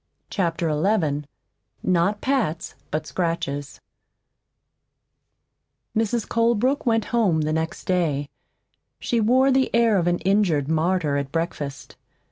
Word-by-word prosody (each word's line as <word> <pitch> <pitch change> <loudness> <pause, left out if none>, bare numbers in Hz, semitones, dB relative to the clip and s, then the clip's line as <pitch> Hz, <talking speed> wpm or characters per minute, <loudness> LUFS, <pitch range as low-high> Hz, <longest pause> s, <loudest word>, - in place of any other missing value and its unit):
CHAPTER 170 -3 0
XI 150 -3 +1 0.6
NOT 185 +3 +1
PATS 235 - -1 0.2
BUT 155 +1 -2
SCRATCHES 145 -5 -3 2.2
Mrs. 225 +1 0
Colebrook 235 +4 +1
went 225 -2 +2
home 195 -10 +3
the 155 0 -1
next 160 +1 -3
day. 155 -6 0 0.7
She 235 - 0
wore 255 +5 +4
the 265 0 +2
air 230 -3 +4
of 175 - 0
an 175 0 +2
injured 185 -8 +2
martyr 160 -2 +1
at 140 -1 -3
breakfast. 150 -4 -4
175 Hz, 110 wpm, -23 LUFS, 155-225 Hz, 2.2 s, wore